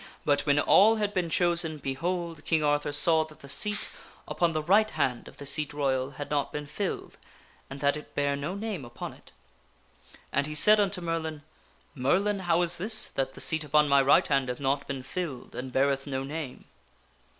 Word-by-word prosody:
But 145 0 +1
when 145 0 +3
all 210 +8 +5
had 210 -2 -1
been 180 -3 -1
chosen, 170 -2 +1
behold! 165 +3 -3
King 160 -2 +1
Arthur 145 0 +1
saw 160 +2 +4
that 155 -1 -17
the 140 - -11
seat 210 +9 0 0.4
upon 170 -1 +1
the 155 -1 -2
right 205 +6 +4
hand 135 - -2
of - - -14
the 140 - -9
Seat 150 +1 0
Royal 135 -2 0
had 145 - -6
not 145 -1 0
been 150 0 -5
filled, 195 +6 -5 0.5
and 135 0 -8
that 140 0 +2
it 150 - -10
bare 145 0 +1
no 150 +7 -4
name 200 -7 -4
upon 120 -1 -7
it. - - -19 1.0
And 140 +1 +1
he 150 - -6
said 210 +7 +6
unto 200 -2 0
Merlin: 160 -3 -3 0.3
" - - -35
Merlin, 190 +10 +1
how 175 -1 +2
is 175 0 -2
this, 215 +4 +1
that 135 0 -3
the - - -5
seat 160 -1 +2
upon 150 0 +3
my 140 -1 +5
right 135 +1 +4
hand 135 -3 +1
hath 125 - -4
not 140 0 -1
been 135 -2 -5
filled, 140 -3 -5
and 130 +1 -6
beareth 135 +1 +1
no 135 -1 -3
name?" 145 -2 -6
150 Hz, 200 wpm, -28 LUFS, 140-175 Hz, 1.0 s, said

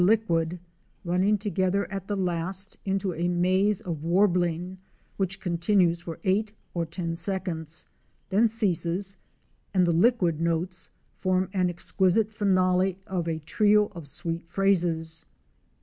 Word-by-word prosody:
liquid, 180 -5 +2 0.5
running 185 +4 +2
together 200 -1 0
at 195 -1 -5
the 205 - -1
last 185 +2 -1
into 195 -1 -1
a 170 +2 -1
maze 185 +3 +2
of 165 -4 -5
warbling 175 0 +1 0.4
which 195 -1 -1
continues 170 0 +1
for 165 -2 -7
eight 205 +2 +1 0.2
or 170 -2 -2
ten 165 0 -4
seconds 165 -3 -1 0.2
— - - -42
then 215 +5 +4
ceases, 195 -3 +2 0.6
and 185 -1 +4
the 170 - +2
liquid 175 -3 +2
notes 170 +2 -2 0.3
form 185 0 +1
an 185 -2 +1
exquisite 190 +4 +1
finale 185 -3 +2
of 180 -3 -3
a 165 -1 -1
trio 210 +6 +2
of 170 -5 -9
sweet 165 +4 -4
phrases. 170 - +1
185 Hz, 135 wpm, -26 LUFS, 170-195 Hz, 0.6 s, then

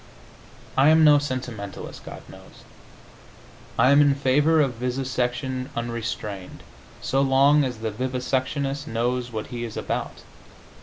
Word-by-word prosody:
I 135 +3 +5
am 160 0 +6
no 150 -1 +7
sentimentalist, 125 -7 -6
God - - -9
knows. - - -15 1.1
I 130 - +5
am 140 +1 +7
in 145 -1 +4
favor 145 +4 +3
of 135 -4 +2
vivisection 130 +1 -2
unrestrained, 115 -5 -5 0.4
so 135 - +1
long 140 +2 +4
as 125 -3 -3
the 110 0 -3
vivisectionist 130 +4 -2
knows 120 +2 -1
what 110 -2 -4
he 120 0 -4
is 115 -2 -6
about. - - -4
130 Hz, 125 wpm, -24 LUFS, 120-140 Hz, 1.1 s, no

